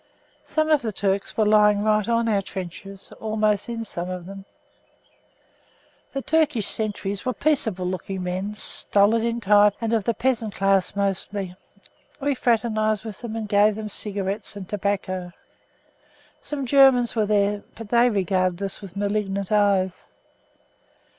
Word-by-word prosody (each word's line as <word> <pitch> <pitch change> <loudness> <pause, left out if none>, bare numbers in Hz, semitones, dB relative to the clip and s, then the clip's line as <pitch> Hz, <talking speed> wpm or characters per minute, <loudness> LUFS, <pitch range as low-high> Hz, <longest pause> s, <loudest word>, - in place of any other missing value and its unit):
Some 310 0 0
of 300 -2 +4
the 225 -3 -3
Turks 195 0 -2
were 215 - +3
lying 210 -1 +4
right 215 0 +2
on 230 0 +2
our 205 -3 +2
trenches, 190 +1 -8
almost 215 -1 0
in 230 -1 -3
some 180 -4 -5
of 180 -1 -5
them. 195 +1 -10 1.7
The 275 -1 -3
Turkish 305 -9 +1
sentries 205 -3 -3
were 255 -2 -2
peaceable 220 -10 0
looking 185 +1 -4
men, 185 +3 -3
stolid 210 +1 +2
in 235 0 -1
type 205 -1 +4
and 230 0 -1
of 220 -4 +1
the 235 - 0
peasant 230 -3 -1
class 195 -1 +1
mostly. 195 -1 -2 0.6
We 285 0 0
fraternised 220 -3 0
with 215 -3 -7
them 230 -2 -6
and 220 -2 -4
gave 205 +1 +4
them 215 0 -5
cigarettes 200 0 -3
and 195 -3 -8
tobacco. 190 -3 -3 1.1
Some 285 -2 -4
Germans 255 -2 +5
were 215 -2 +1
there, 205 0 +1
but 225 -2 -9
they 240 +1 +4
viewed 185 -2 0
us 195 - +1
with 195 -1 -10
malignant 200 -1 -2
eyes. 200 -3 +3
210 Hz, 145 wpm, -23 LUFS, 195-225 Hz, 1.7 s, Germans